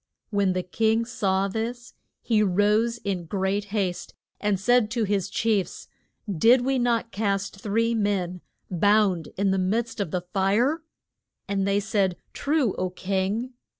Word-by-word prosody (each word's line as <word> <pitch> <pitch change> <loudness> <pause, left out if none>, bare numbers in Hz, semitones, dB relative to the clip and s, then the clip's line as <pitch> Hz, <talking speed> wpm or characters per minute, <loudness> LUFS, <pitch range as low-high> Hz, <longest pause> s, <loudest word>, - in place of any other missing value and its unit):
When 200 -3 +2
the 185 0 -1
king 220 +5 +1
saw 195 -5 0
this 235 +4 -4 0.3
he 220 -3 +2
rose 210 +4 +2
in 195 -6 -3
great 195 +3 -1
haste 195 -3 -3 0.2
and 205 -2 0
said 245 +1 +3
to 235 0 -1
his 200 -3 0
chiefs, 215 -5 -1 0.4
Did 225 +7 +4
we 265 +1 +1
not 235 -1 0
cast 200 -2 -1
three 230 +3 +1
men 195 -5 -1 0.3
bound 195 -2 +3
in 195 0 +2
the 190 - +1
midst 220 +5 -1
of 200 -5 -1
the 180 +2 -2
fire? 205 - +1 0.7
And 195 -1 0
they 200 0 +2
said, 195 -3 0 0.2
True, 285 -7 +1
O 185 - 0
king. 195 +7 -2
205 Hz, 150 wpm, -25 LUFS, 190-230 Hz, 0.7 s, Did